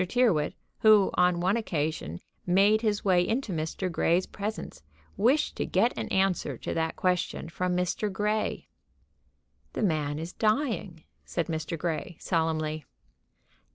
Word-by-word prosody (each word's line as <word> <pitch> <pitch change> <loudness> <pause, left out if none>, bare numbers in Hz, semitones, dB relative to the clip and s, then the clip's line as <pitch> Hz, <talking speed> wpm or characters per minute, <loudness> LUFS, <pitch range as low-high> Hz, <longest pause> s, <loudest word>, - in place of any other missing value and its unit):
Tyrrwhit, 185 -7 +2 0.2
who 215 -3 +6
on 180 -1 +3
one 185 +4 +2
occasion 155 - -2 0.2
made 200 +4 +4
his 210 -3 0
way 185 -2 +4
into 225 +2 -1
Mr. 160 +4 -2
Grey's 170 +2 +2
presence, 215 +2 -6 0.3
wished 260 +8 +2
to - - 0
get 225 +7 +2
an - - -3
answer 185 -8 0
to - - -4
that 160 0 -1
question 180 -2 -1
from 180 +1 -1
Mr. 180 +3 -1
Grey. 210 +2 -1 1.1
"The - - -2
man 150 -6 0
is 165 +3 -6
dying," 215 - 0 0.2
said 170 - -2
Mr. 160 0 -3
Grey, 165 +1 -3
solemnly. 155 -2 -1
180 Hz, 135 wpm, -28 LUFS, 160-210 Hz, 1.1 s, who